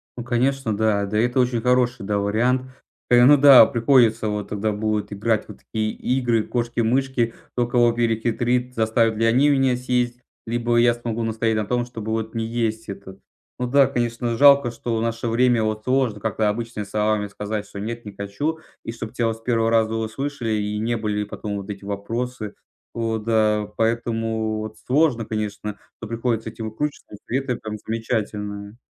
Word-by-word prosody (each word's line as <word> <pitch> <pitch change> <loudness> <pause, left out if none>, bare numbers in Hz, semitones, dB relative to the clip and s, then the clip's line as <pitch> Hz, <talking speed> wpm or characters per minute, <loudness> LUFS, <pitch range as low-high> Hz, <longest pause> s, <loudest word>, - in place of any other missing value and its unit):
Ну, 120 - -6
конечно, 120 -1 0
да. 105 -1 +1
Да, 105 +2 -2
это 120 +4 +2
очень 125 -2 +1
хороший, 125 -3 +1
да, 105 0 0
вариант. 115 +6 +1 0.5
Э, 120 0 +6
ну 145 +2 +8
да. 140 -2 +9
Приходится 115 -3 +3
вот 105 -1 -3
тогда 105 +1 -1
будет 105 0 -2
играть 110 +2 0
вот - - -11
в - - -33
такие 110 -1 -2
игры 120 -3 0
в - - -15
кошки-мышки. 120 +1 0 0.2
Кто 120 -1 0
кого 120 -1 +3
перехитрит, 120 +2 0
заставят 110 0 +2
ли 115 - +2
они 130 +6 +4
меня 135 -3 +3
съесть, 125 -1 -1 0.3
либо 120 +1 0
я 120 0 +5
смогу 115 -1 -4
настоять 110 0 0
на 105 - -1
том, 120 +3 0
чтобы 110 -3 -6
вот 110 0 -2
не 115 - -1
есть 115 -1 -2
это. 95 -1 -8 0.4
Ну 125 - 0
да, 140 +1 +5
конечно, 120 -2 -2
жалко, 140 -3 +6
что 115 0 -3
в - - -1
наше 115 +1 -2
время 120 0 +3
вот 110 0 -2
сложно 130 -4 +1
как-то 110 0 0
обычными 115 -1 -4
словами 105 0 0
сказать, 105 +1 -4
что 100 - -9
нет, 115 +3 -5
не 105 - -8
хочу. 100 +12 -3 0.3
И - - -3
чтоб 115 -1 -7
тя 120 -2 0
вот 115 0 -2
с - - -22
первого 115 -1 +1
раза 110 -1 +2
услышали 115 +2 -3
и 105 -1 -1
не 115 +2 0
были 105 -1 -1
потом 105 0 -5
вот 100 +1 -7
эти 100 -1 -9
вопросы. 110 +2 -4 0.4
Вот, 110 -2 -2
да. 110 -2 +2
Поэтому 115 -1 -1
вот 110 0 -6
сложно, 130 -4 +2
конечно, 105 -1 -4 0.2
но 110 - -6
приходится 115 0 -2
этими 110 0 -7
выкручиваться. 140 +1 -5
И - - -12
при 130 - 0
этом 125 -3 -3
там 110 -1 -6
замечательное. 105 -2 -3
115 Hz, 185 wpm, -22 LUFS, 110-120 Hz, 0.5 s, да